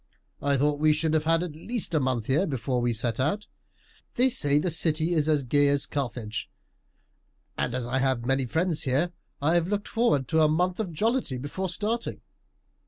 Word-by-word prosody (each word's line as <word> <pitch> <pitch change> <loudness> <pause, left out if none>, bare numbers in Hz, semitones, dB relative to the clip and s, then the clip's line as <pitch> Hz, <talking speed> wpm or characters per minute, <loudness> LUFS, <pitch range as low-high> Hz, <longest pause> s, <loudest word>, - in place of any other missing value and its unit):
"I 140 -1 +1
thought 145 +2 +1
we 155 0 +4
should 155 +1 0
have 155 -1 +1
had 165 +1 +3
at 165 -4 -6
least 220 +4 -4
a 155 - +3
month 130 -5 -1
here 145 - +1
before 130 -3 -1
we 120 0 +1
set 115 +1 -2
out. 155 +11 0 0.7
They 255 +2 +4
say 145 - +3
the 170 +4 +1
city 160 +1 +1
is 155 -2 +2
as 150 -3 +2
gay 145 +3 +3
as 140 0 +2
Carthage; 120 -5 -4 1.1
and 125 - -2
as 130 -2 -2
I 130 +2 -1
have 130 -3 0
many 135 0 +1
friends 165 +4 0
here 145 +6 0 0.3
I 160 +3 +3
have 170 -1 +2
looked 205 +1 -2
forward 225 - +1
to 160 -1 +3
a 155 - +6
month 180 +5 0
of 200 -6 -2
jollity 220 - 0
before 145 +9 -4
starting. 220 +6 -2
150 Hz, 195 wpm, -27 LUFS, 130-175 Hz, 1.1 s, a